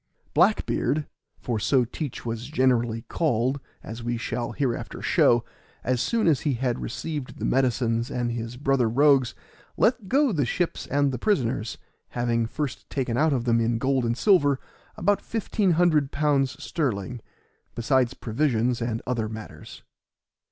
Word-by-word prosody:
Black - - +4
beard 150 +1 0 0.3
(for 115 -3 -2
so 125 +3 +3
Teach 130 +2 -6
was 115 +1 -4
generally 120 -5 +1
called, 130 -3 0 0.2
as 115 +1 -7
we 120 0 -2
shall 120 0 -3
hereafter 130 -5 -2
show), 120 0 +3 0.4
as 125 -1 0
soon 230 -2 +1
as 155 -6 +4
he 145 -4 0
had 125 0 -1
received 145 +2 -5
the - - -3
medicines 120 -2 +1
and 120 -3 -1
his 115 +1 -5
brother 135 -3 +2
rogues, 135 0 +4 0.4
let 215 +1 +2
go 280 0 +3
the 155 -7 +1
ships 170 +8 -2
and 140 0 +2
the 125 - -4
prisoners, 120 - 0 0.4
having 120 -1 +1
first 145 +2 -5
taken 130 -4 -2
out 155 +5 +3
of 130 -4 0
them 115 -1 +3
in 115 0 +1
gold 130 +2 +1
and 115 0 0
silver 145 -9 +4 0.4
about 205 +3 +2
£1,500 155 - +1
sterling, 125 - -2 0.5
besides 125 +1 +1
provisions 120 -1 0
and 115 -1 -2
other 115 -3 -1
matters. 110 -9 -10
125 Hz, 145 wpm, -25 LUFS, 115-145 Hz, 0.5 s, Black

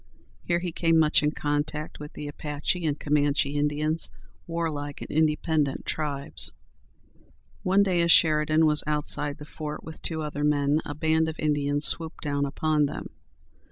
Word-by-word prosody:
Here 170 - 0
he 175 0 -3
came 165 0 +2
much 155 -1 +5
in 150 - +2
contact 150 +1 -3
with 150 0 -9
the 150 - -6
Apache 150 +4 -2
and 150 -1 -1
Comanche 145 -1 +1
Indians, 150 +2 0 0.4
warlike 155 -4 -3
and - - -8
independent 155 -2 +1
tribes. 145 -2 -2 1.1
One 195 +2 +3
day, 180 -3 +1
as 170 0 +4
Sheridan 155 0 +4
was 150 -1 +3
outside 150 -1 0
the 150 - -10
fort 150 0 -6
with 160 - -10
two 160 -2 -1
other 145 -1 -4
men, 145 +1 +2
a 145 - -5
band 160 +1 +1
of 160 - -7
Indians 145 -1 0
swooped 160 -1 +2
down 140 -1 0
upon 150 +1 +1
them. - - -6
150 Hz, 160 wpm, -26 LUFS, 145-160 Hz, 1.1 s, much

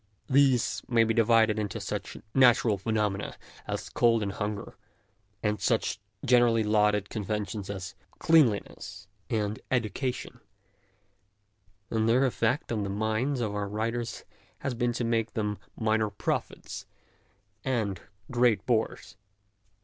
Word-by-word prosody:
These 135 -3 +3
may 115 -2 +4
be 115 0 +1
divided 110 -1 +4
into 105 -3 -3
such - - -5 0.2
natural 120 -5 +5
phenomena 105 -1 -1 0.3
as - - -3
cold 115 -2 +3
and 100 - -2
hunger, 105 +1 -4 0.7
and 105 -2 0
such 110 0 +1 0.3
generally 120 -3 +4
lauded 105 -1 +2
conventions 105 -2 -3
as 95 -2 -5 0.2
cleanliness 140 -11 +2 0.2
and 105 -1 -1
education, 125 +1 -2 1.5
and 110 0 +1
their 125 +4 +4
effect 125 +1 0
on 110 -3 0
the 100 - -2
minds 110 +6 0
of 105 -3 -1
our 105 -1 -2
writers 115 +3 -3 0.4
has 135 - -2
been 120 0 0
to 120 - -2
make 115 -2 0
them 105 -2 -1 0.2
minor 110 -1 +2
prophets - - -4 0.8
and 110 -8 -1 0.3
great 120 -3 +3
bores. 110 -3 -1
110 Hz, 120 wpm, -28 LUFS, 105-120 Hz, 1.5 s, natural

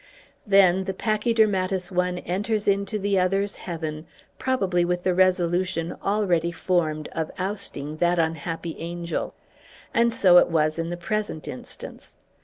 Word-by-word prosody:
Then 190 -2 +5
the 190 -1 -3
pachydermatous 210 -4 +1
one 180 0 0
enters 210 +4 -2
into 200 +1 +1
the 200 -1 +1
other's 195 +2 0
heaven, 160 -3 -5 0.3
probably 195 -9 +1
with 175 0 -1
the 185 - +2
resolution 180 -2 +1
already 180 -5 +1
formed 160 -4 -1
of 160 -1 -3
ousting 185 -6 -4
that 175 +2 +2
unhappy 165 0 -2
angel. 170 0 -4 0.6
And 235 0 +3
so 180 -5 +6
it - - +3
was 155 -1 +1
in 165 0 -2
the 175 - -4
present 210 -3 -3
instance. 125 - -9
180 Hz, 135 wpm, -25 LUFS, 170-200 Hz, 0.6 s, so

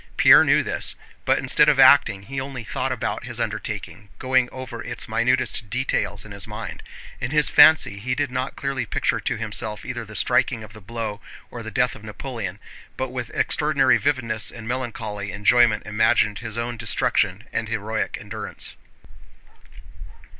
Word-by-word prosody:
Pierre - - +8
knew - - +3
this, - - -3 0.3
but - - +3
instead - - +3
of - - +2
acting 100 0 +6
he 135 +5 -4
only 130 -3 -6
thought - - -2
about - - -3
his - - -7
undertaking, 105 - -5
going 130 -1 +2
over 130 -3 -7
its 120 0 -5
minutest 115 -1 0
details 105 -4 -1
in 105 - -11
his 100 +1 -5
mind. 105 +1 -7 0.4
In - - -3
his 150 +1 +2
fancy 155 -10 +6
he 125 +4 -2
did 145 -1 -1
not 130 +1 -3
clearly 135 -1 -3
picture - - 0
to - - -2
himself 105 -1 -4
either 120 -2 -4
the 110 -1 -11
striking 125 +1 +1
of 105 -1 -12
the 110 - -12
blow 110 0 -5 0.3
or 120 - -7
the 110 - -6
death 125 +1 +1
of 105 - -12
Napoleon, 110 -3 -6 0.4
but 130 0 -2
with 125 -2 -5
extraordinary 140 -4 +3
vividness 115 -6 0
and 115 -2 -9
melancholy 110 -5 -4
enjoyment 105 +2 +3
imagined 110 -1 +2
his 115 -2 -6
own 120 0 -3
destruction 110 -1 0
and 115 - -2
heroic 110 0 -2
endurance. - - -7
115 Hz, 165 wpm, -23 LUFS, 105-130 Hz, 0.4 s, Pierre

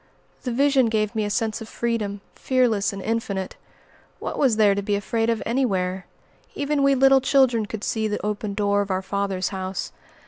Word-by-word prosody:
The 250 - -3
vision 270 0 +3
gave 215 -1 0
me 215 -2 -1
a - - -2
sense 225 +1 -1
of 220 - -8
freedom, 215 -4 -2
fearless 245 -6 +1
and 195 -1 -7
infinite. 205 -4 -2 0.6
What - - -5
was 260 -6 +3
there 210 -2 +4
to 200 - -1
be 205 +1 0
afraid 225 +3 -1
of 230 -1 0
anywhere? 190 -7 -1 0.5
Even 290 0 0
we 275 0 +4
little 270 0 +5
children 255 -5 +3
could 210 0 -6
see 220 -1 -1
the 210 -1 -3
open 210 -1 -3
door 205 -1 +2
of 200 - -4
our 190 0 -1
Father's 195 -1 -2
house. 190 -1 -4
215 Hz, 185 wpm, -23 LUFS, 200-240 Hz, 0.6 s, little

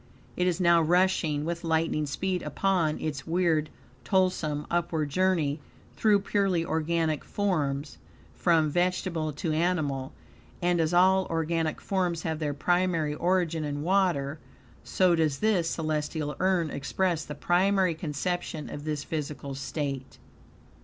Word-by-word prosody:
It 180 - +1
is 180 -1 0
now 170 -2 +5
rushing 165 -3 +2
with 170 +1 -3
lightning 160 -2 0
speed 180 +5 -2
upon 180 -6 0
its 145 -4 -4
weird, 165 -3 +1 0.3
toilsome, 155 -1 +1
upward, 160 -3 0
journey 165 -4 +1 0.4
through 210 -2 +3
purely 195 -4 +1
organic 160 -1 0
forms, 150 -8 -2 0.3
from 165 -3 +3
vegetable 175 -2 0
to 155 +3 -3
animal; 155 -6 0 0.5
and, 175 -1 +2
as 160 0 +1
all 190 +2 +4
organic 165 -1 -1
forms 180 -4 -1
have 160 -1 -2
their 145 -2 -2
primary 175 -2 +1
origin 170 -1 0
in 145 0 -3
water, 170 -6 +1 0.4
so 185 -2 +2
does 155 -4 +1
this 195 -6 +1
celestial 155 -2 -2
urn 185 -5 +1
express 170 +3 -1
the 150 - -7
primary 185 +3 +2
conception 160 0 -3
of 145 +1 -7
this 150 -2 -2
physical 145 -3 -4
state. 135 -1 -4
165 Hz, 130 wpm, -28 LUFS, 150-180 Hz, 0.5 s, now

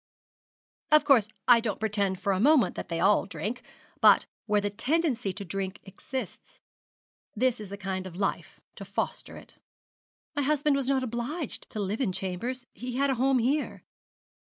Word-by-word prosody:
Of 305 -1 +6
course, 255 -8 +5 0.2
I 245 -2 +8
don't 225 -3 -3
pretend 200 -3 0
for 200 - 0
a 185 - -1
moment 285 +3 +4
that - - -6
they 165 -1 -2
all 195 +2 +3
drink; 230 +4 -4 0.4
but - - +6 0.2
where 210 -1 +3
the 205 0 -2
tendency 250 - 0
to 200 0 -7
drink 190 +2 -4
exists 255 +7 -7 0.8
this 250 +1 +1
is 210 -3 -8
the 200 - -6
kind 190 -1 -4
of 175 - -10
life 195 +1 -3 0.2
to - - -7
foster - - -4
it.' - - -15 0.8
'My 290 - +1
husband 295 0 +2
was 275 -1 0
not 265 -1 +2
obliged 255 +5 -4
to 215 - -5
live 205 +4 -2
in 225 -8 +1
chambers 215 +8 -3
he 250 0 -6
had 275 +1 +2
a 250 -2 -2
home 270 0 +4
here.' 270 +5 0
230 Hz, 175 wpm, -28 LUFS, 195-265 Hz, 0.8 s, I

